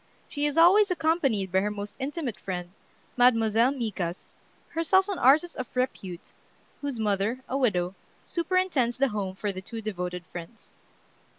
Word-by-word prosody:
She 290 0 -1
is 295 +2 -3
always 390 +5 +6
accompanied 310 - +1
by 190 - +3
her 205 +2 0
most 205 0 -6
intimate 275 -3 -3
friend, 180 -2 -5 0.5
Mademoiselle 230 -1 +4
Micas, 200 -9 -4 0.4
herself 375 +4 +2
an 400 -3 -3
artist 305 +7 +4
of 255 - -4
repute, 190 -8 -3 0.5
whose 285 -4 -3
mother, 210 +3 0
a 260 - -3
widow, 185 -9 +1 0.3
superintends 340 -8 0
the 275 +1 +3
home 200 -3 -3
for 205 +1 -2
the 185 -1 -7
two 225 +4 -7
devoted 180 -5 -4
friends. 175 +4 -10
235 Hz, 150 wpm, -27 LUFS, 195-290 Hz, 0.5 s, always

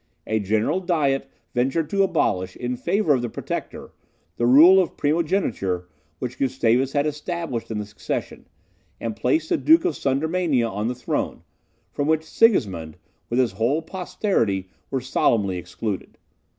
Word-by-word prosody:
A 110 0 0
general 110 - +1
Diet 155 -7 0 0.2
ventured 135 +6 +1
to 200 -1 +2
abolish, 95 - +1
in 125 0 -3
favour 160 - +1
of 130 - +1
the 120 - -3
Protector, - - -6 0.5
the 120 - +2
rule 170 +9 +8
of 180 - -4
primogeniture 145 - 0 0.3
which 125 +6 -5
Gustavus 130 0 +1
had 145 0 +2
established 150 -4 -3
in 110 - -3
the 105 - -3
succession, 105 - -5 0.5
and 115 -2 -3
placed 130 +8 0
the - - +2
Duke 160 +5 +5
of 150 - +1
Sudermania 145 -2 +1
on 105 +1 -3
the 125 - -2
throne, 125 - -3 0.5
from 145 - -2
which 160 0 +2
Sigismund, 105 - +2 0.3
with 120 - -1
his 125 -3 +3
whole 120 +11 0
posterity, 160 - -1 0.2
were 135 - -1
solemnly 105 -7 +1
excluded. 95 +3 -5
130 Hz, 150 wpm, -23 LUFS, 110-160 Hz, 0.5 s, rule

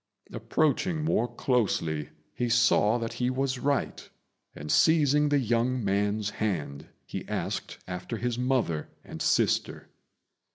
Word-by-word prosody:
Approaching 155 +2 0
more 120 -6 +1
closely, 90 - -1 0.2
he 120 -1 -2
saw 115 -1 +4
that 115 -1 -4
he 125 - +2
was 130 0 -1
right; 140 +1 -1 0.5
and, 75 +1 -5
seizing 150 -2 +4
the 145 - +3
young 120 -1 0
man's 105 +1 0
hand, 85 -11 -3 0.2
he - - -6
asked - - -4
after 90 +5 -5
his 120 +1 -2
mother 125 - 0
and - - -9
sister. - - +1
120 Hz, 125 wpm, -28 LUFS, 105-135 Hz, 0.5 s, saw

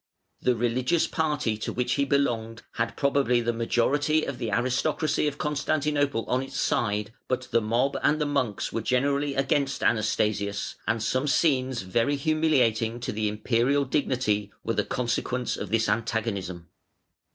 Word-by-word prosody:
The 125 - +2
religious 125 +8 +1
party 150 -8 -1
to 110 - -4
which 125 0 -1
he 140 - +1
belonged 115 -5 0
had 115 -1 -2
probably 140 -3 +2
the 120 0 0
majority 145 +7 +1
of 135 -3 -5
the 115 - -2
aristocracy 130 +7 0
of 145 -1 -3
Constantinople 145 -4 0
on 125 - +1
its 135 - -6
side, 105 0 0
but 130 0 -1
the 115 - +3
mob 120 +6 +1
and 150 +1 +2
the 150 - +1
monks 140 -8 -1
were 115 - -1
generally 140 +4 +1
against 135 0 0
Anastasius, 105 -2 0
and 115 0 0
some 130 +5 0
scenes 130 - +1
very 115 +9 +1
humiliating 135 -7 +1
to - - -2
the 105 0 -1
Imperial 120 +6 +1
dignity 125 -7 0
were 115 - -1
the - - +1
consequence 125 0 -1
of - - -5
this 115 0 +1
antagonism. 100 -6 -2
125 Hz, 150 wpm, -26 LUFS, 115-140 Hz, -, the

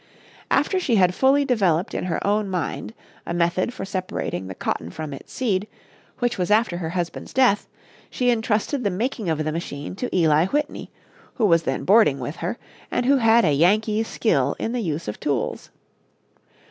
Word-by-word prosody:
After 380 - +2
she 275 -10 +1
had 180 -3 +4
fully 275 +6 +3
developed 195 - +1
in - - -2
her 170 -3 -2
own 205 0 +1
mind 185 +5 -3 0.3
a 170 - -4
method 175 +5 +1
for 250 - -6
separating 185 - -4
the 95 - -7
cotton 85 - -3
from 150 - -6
its 135 - -11
seed, 210 -5 -1 0.5
which 245 -5 -1
was 180 - 0
after 210 -4 +3
her 165 -2 -3
husband's 175 0 -4
death, 250 -6 +3 0.4
she 250 -1 +1
intrusted 230 +3 0
the 205 - +2
making 215 0 -2
of 155 -1 0
the 155 - -1
machine 155 -1 -5
to 250 - -3
Eli 160 0 +4
Whitney, 295 +6 -2 0.5
who 230 - +1
was 165 -4 +4
then 135 -5 -2
boarding 200 -8 +5
with 140 +4 -5
her, 175 +8 -3 0.3
and 245 - -1
who 275 +2 +4
had 225 -3 +4
a 150 - +3
Yankee's 210 +8 +2
skill 140 - +1
in 225 - -2
the 245 0 -1
use 165 -4 -3
of 105 - -5
tools. 140 -6 -2
190 Hz, 185 wpm, -23 LUFS, 160-230 Hz, 0.5 s, boarding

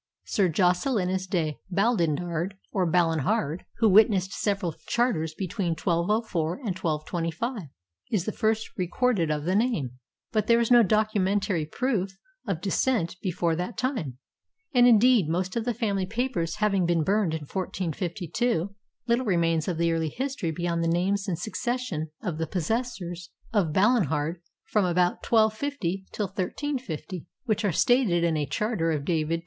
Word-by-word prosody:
Sir 195 -3 +2
Jocelynus 185 - +1
de 160 -5 -1
Baldendard, 175 -3 0 0.2
or 185 -3 +1
Balinhard, 165 -2 +1
who 225 - +4
witnessed 200 -2 +4
several 200 -6 -1
charters 165 -11 0
between 185 -2 -2
1204 175 0 0
and 210 -5 -4
1225, 170 - -3 0.4
is 190 -5 +1
the 215 - -1
first 220 +1 0
recorded 185 -1 +1
of 150 -1 -1
the 180 - +1
name, 165 - 0 0.3
but 215 -2 0
there 235 0 +5
is 235 0 0
no 240 -1 +8
documentary 205 -4 +1
proof 195 -2 -1 0.3
of 185 -5 -2
descent 195 -2 0
before 175 -3 0
that 180 +7 -4
time; 230 - -2 0.6
and, 245 -1 +6
indeed, 230 -6 +5
most 180 +2 -1
of 230 -1 -1
the 245 - 0
family 200 -5 -1
papers 225 -7 -1
having 200 -4 +1
been 170 -2 +2
burned 195 -3 +1
in 160 - -4
1452, 180 - -2 0.3
little 240 +1 +1
remains 165 -4 +1
of 180 -3 -1
the 170 0 +2
early 165 -1 0
history 260 - -3
beyond 170 +1 -1
the - - +1
names 190 +4 +1
and 180 -4 -1
succession 230 -8 -3
of 160 -3 -3
the 160 - -1
possessors 180 -2 -3 0.2
of 190 -8 +2
Balinhard 170 - +2 0.2
from 210 - +1
about 180 0 +2
1250 220 -4 +1
till 210 - -2
1350, 190 - -4 0.2
which 220 -2 0
are 200 - +2
stated 200 - +3
in 170 -2 +2
a 150 -2 -1
charter 170 - 0
of 145 -3 -2
David 160 -2 0
II. - - -7
185 Hz, 150 wpm, -26 LUFS, 165-220 Hz, 0.6 s, no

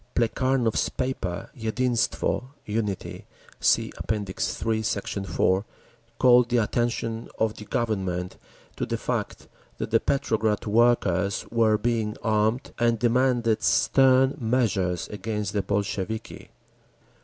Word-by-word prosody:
Plekhanov's 120 0 +1
paper, 115 -5 -3
Yedinstvo 120 +1 0 0.2
(Unity) 105 -2 -3 0.3
(See - - +2
App. - - -4
III, 110 +2 -1
Sect. 100 -2 -3
4), 95 +1 +1 0.5
called 125 -1 +5
the 120 - +2
attention 115 0 -1
of 110 -1 +1
the 105 - -10
Government 95 -6 -2 0.4
to - - -2
the - - -1
fact - - -3 0.3
that - - -4
the 115 - +5
Petrograd 110 -7 0
workers 105 -4 +2
were 110 -2 +3
being 110 -2 -1
armed, 110 +4 +1
and 115 -1 +3
demanded 120 -1 +2
stern 135 0 +4
measures 110 - 0
against 105 -1 -3
the 105 - +1
Bolsheviki. 100 +2 -3
110 Hz, 110 wpm, -25 LUFS, 105-120 Hz, 0.5 s, called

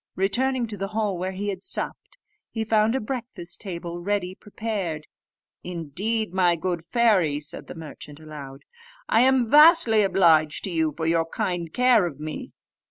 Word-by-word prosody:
Returning 245 +6 +1
to 215 -2 -7
the 195 +1 -3
hall 210 -3 0
where 185 +2 -3
he 205 +2 -3
had 195 - -5
supped, 380 - -4 0.3
he 225 - -3
found 220 +1 +2
a - - +1
breakfast 215 -8 -5
table, 175 -3 -6
ready 190 -1 -1
prepared. 195 -7 -5 0.6
"Indeed, 180 +5 -3
my 180 -2 +3
good 170 0 -3
fairy," 185 -7 +2
said 150 0 -6
the - - -9
merchant 150 -2 -10
aloud, 145 -3 -10 0.4
"I 225 - +4
am 260 -2 +3
vastly 300 -8 +7
obliged 165 -6 +3
to 190 - -3
you 160 -2 +1
for 160 - -2
your 165 0 +1
kind 170 -1 -3
care 245 -5 +4
of 145 -4 -9
me." 155 0 -6
185 Hz, 165 wpm, -24 LUFS, 165-220 Hz, 0.6 s, vastly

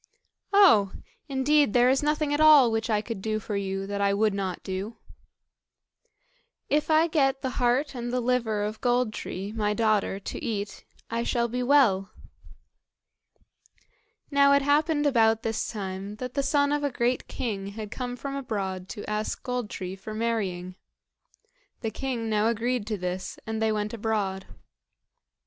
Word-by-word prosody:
"Oh! 285 - +6 0.4
indeed 280 -1 +3
there 245 0 +5
is 265 +1 +3
nothing 300 0 0
at 290 - 0
all 295 -6 +7
which 225 +1 -1
I 210 -1 +2
could 225 -4 -5
do 215 +1 -1
for 210 0 -5
you 195 -1 -2
that 200 0 -3
I 200 0 +2
would 210 0 +2
not 190 -3 -3
do." 195 +4 -5 1.7
"If 300 +2 +1
I 315 +1 +5
get 275 -5 +1
the 260 - -1
heart 250 +5 +2
and 240 -1 -4
the 250 - 0
liver 235 -4 0
of 215 +1 -4
Gold 245 -2 +1
tree, 195 0 -5
my 210 -1 -1
daughter, 215 -3 +1
to - - -7
eat, 205 -2 -4 0.3
I 230 0 0
shall 235 0 0
be 250 +2 -3
well." 245 -8 +3 2.2
Now 280 0 +5
it 280 0 +4
happened 295 +1 +2
about 225 -4 +3
this 225 -1 -2
time 195 -1 -5
that 250 +2 -6
the 280 - 0
son 285 +1 +2
of 295 0 0
a 285 - +1
great 245 0 -1
king 200 -5 -4
had 210 +1 -7
come 245 -1 -4
from 275 +3 -5
abroad 195 -8 -4
to 210 - -7
ask 210 0 -3
Gold 250 -3 -3
tree 185 0 -5
for 215 +3 -8
marrying. 200 -6 -2 1.1
The 225 - -2
king 240 -1 -3
now 215 0 +2
agreed 235 0 -1
to 215 -2 -2
this, 180 0 -4
and 220 0 -3
they 220 0 +2
went 210 0 -2
abroad. 205 -4 -2
225 Hz, 165 wpm, -27 LUFS, 205-260 Hz, 2.2 s, all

